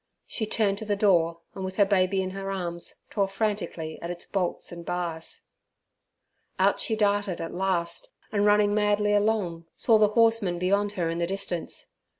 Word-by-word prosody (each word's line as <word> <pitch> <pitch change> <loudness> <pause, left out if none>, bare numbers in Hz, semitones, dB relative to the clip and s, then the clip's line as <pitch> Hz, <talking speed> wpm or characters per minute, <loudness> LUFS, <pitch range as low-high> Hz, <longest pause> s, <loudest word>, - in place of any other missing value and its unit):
She 220 - -3
turned 205 -2 +1
to 220 - -6
the 205 -1 0
door, 170 -5 +2
and 190 - -6
with 190 0 -4
her 200 - +5
baby 190 -1 +2
in 185 - -4
her 195 0 -5
arms 175 -3 -4 0.2
tore 200 -2 +1
frantically 195 -6 -3
at 170 - -5
its 175 0 -6
bolts 185 -3 -2
and 170 0 -8
bars. 170 -2 -4 1.1
Out - - +3
she 220 - 0
darted 205 -3 +1
at 165 - -5
last, 175 -2 -1 0.2
and 205 -1 +1
running 205 0 +4
madly 210 0 +2
along, 205 -6 0
saw 225 -3 +4
the 210 - +6
horseman 225 -6 +3
beyond 200 +3 +1
her 175 -4 -1
in 165 - -3
the 170 - 0
distance. 190 -2 -4
195 Hz, 175 wpm, -27 LUFS, 175-205 Hz, 1.1 s, the